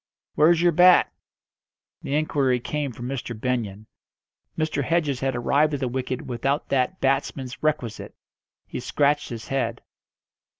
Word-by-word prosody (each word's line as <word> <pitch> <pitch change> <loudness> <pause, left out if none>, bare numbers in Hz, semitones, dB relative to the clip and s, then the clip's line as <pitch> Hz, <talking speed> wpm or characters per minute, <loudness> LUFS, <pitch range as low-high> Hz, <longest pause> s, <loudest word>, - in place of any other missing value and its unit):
"Where's 165 +2 +4
your 175 - +5
bat?" 180 +2 +6 0.9
The 140 - -2
inquiry 140 -4 +1
came 145 +3 -3
from 120 +1 -7
Mr. 120 -4 -5
Benyon. 110 -4 -2 0.7
Mr. 155 -2 0
Hedges 150 -3 0
had 135 -1 -1
arrived 145 +5 +2
at - - -4
the 130 - -1
wicket 130 0 -3
without 135 +4 -2
that 135 +7 0
batsman's 135 -1 -1
requisite. 140 -7 -2 0.5
He - - -6
scratched 145 +3 +1
his 115 -2 -7
head. 120 -4 -2
135 Hz, 135 wpm, -24 LUFS, 125-150 Hz, 0.9 s, bat